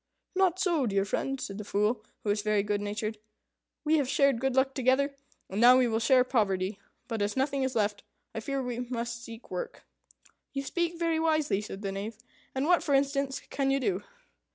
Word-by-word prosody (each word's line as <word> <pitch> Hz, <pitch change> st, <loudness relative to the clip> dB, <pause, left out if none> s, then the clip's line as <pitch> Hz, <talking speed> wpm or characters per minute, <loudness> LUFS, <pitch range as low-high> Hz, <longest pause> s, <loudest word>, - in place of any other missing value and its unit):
"Not 370 Hz, -2 st, +3 dB
so, 340 Hz, -8 st, +1 dB
dear 195 Hz, -1 st, +1 dB
friend," 270 Hz, +7 st, -2 dB
said 200 Hz, -3 st, -5 dB
the -, -, -4 dB
Fool, 210 Hz, +3 st, 0 dB, 0.2 s
who 210 Hz, -, -2 dB
was 205 Hz, 0 st, 0 dB
very 210 Hz, -1 st, +2 dB
good 205 Hz, 0 st, -1 dB
natured; 210 Hz, +1 st, -3 dB, 0.6 s
"we 315 Hz, 0 st, +3 dB
have 275 Hz, -4 st, 0 dB
shared 275 Hz, -4 st, +3 dB
good 265 Hz, -1 st, +1 dB
luck 265 Hz, 0 st, +3 dB
together, 265 Hz, +2 st, +2 dB, 0.3 s
and 195 Hz, +4 st, -2 dB
now 250 Hz, +2 st, +9 dB
we 255 Hz, -1 st, +4 dB
will 225 Hz, -1 st, +1 dB
share 255 Hz, +2 st, +5 dB
poverty. 200 Hz, -5 st, 0 dB, 0.3 s
But 225 Hz, -3 st, -3 dB
as 205 Hz, +4 st, -1 dB
nothing 275 Hz, +1 st, +1 dB
is 265 Hz, 0 st, -1 dB
left, 205 Hz, -2 st, +1 dB, 0.3 s
I -, -, -3 dB
fear 275 Hz, +4 st, -2 dB
we 245 Hz, -1 st, -3 dB
must 235 Hz, -1 st, -4 dB
seek 230 Hz, 0 st, -11 dB
work." 180 Hz, -, -5 dB, 0.7 s
"You 275 Hz, 0 st, -2 dB
speak 340 Hz, +4 st, -1 dB
very 330 Hz, -1 st, +1 dB
wisely," 310 Hz, -10 st, +2 dB
said 205 Hz, -1 st, -7 dB
the 195 Hz, -, -1 dB
Knave, 205 Hz, +3 st, -5 dB, 0.4 s
"And 265 Hz, +2 st, 0 dB
what, 355 Hz, +2 st, +4 dB
for 285 Hz, -, +2 dB
instance, 275 Hz, 0 st, +1 dB
can 275 Hz, -1 st, 0 dB
you 275 Hz, 0 st, +2 dB
do?" 205 Hz, -6 st, -1 dB
250 Hz, 200 wpm, -29 LUFS, 210-275 Hz, 0.7 s, now